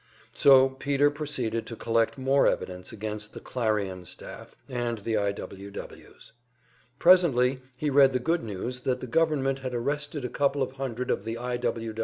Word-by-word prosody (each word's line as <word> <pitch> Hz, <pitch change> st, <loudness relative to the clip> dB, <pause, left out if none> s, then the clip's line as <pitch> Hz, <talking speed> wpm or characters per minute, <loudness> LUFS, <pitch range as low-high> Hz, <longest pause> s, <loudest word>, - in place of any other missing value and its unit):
So 135 Hz, -1 st, +6 dB
Peter 140 Hz, +2 st, +1 dB
proceeded 130 Hz, -7 st, -3 dB
to 115 Hz, -, -6 dB
collect 115 Hz, +1 st, 0 dB
more 135 Hz, +1 st, +3 dB
evidence 90 Hz, 0 st, -2 dB
against 105 Hz, -1 st, -6 dB
the -, -, -7 dB
"Clarion" 100 Hz, -7 st, -2 dB
staff, -, -, -10 dB
and 120 Hz, -3 st, -2 dB
against 105 Hz, -, -14 dB
the 115 Hz, -, 0 dB
I. 100 Hz, -1 st, +1 dB
W. 100 Hz, 0 st, -8 dB
Ws. 100 Hz, -, -11 dB, 0.7 s
Presently 135 Hz, -8 st, +5 dB, 0.2 s
he 150 Hz, +2 st, -1 dB
read 135 Hz, -1 st, +6 dB
the 130 Hz, -, 0 dB
good 165 Hz, +7 st, 0 dB
news 115 Hz, +4 st, -4 dB
that 125 Hz, 0 st, -1 dB
the -, -, -6 dB
government 135 Hz, 0 st, +1 dB
had 130 Hz, -2 st, -4 dB
arrested 145 Hz, +3 st, -2 dB
a -, -, 0 dB
couple 140 Hz, +2 st, +1 dB
of 130 Hz, -, -4 dB
hundred 130 Hz, -2 st, -3 dB
of -, -, -1 dB
the 115 Hz, +1 st, -4 dB
I. 125 Hz, 0 st, -3 dB
125 Hz, 175 wpm, -27 LUFS, 115-140 Hz, 0.7 s, So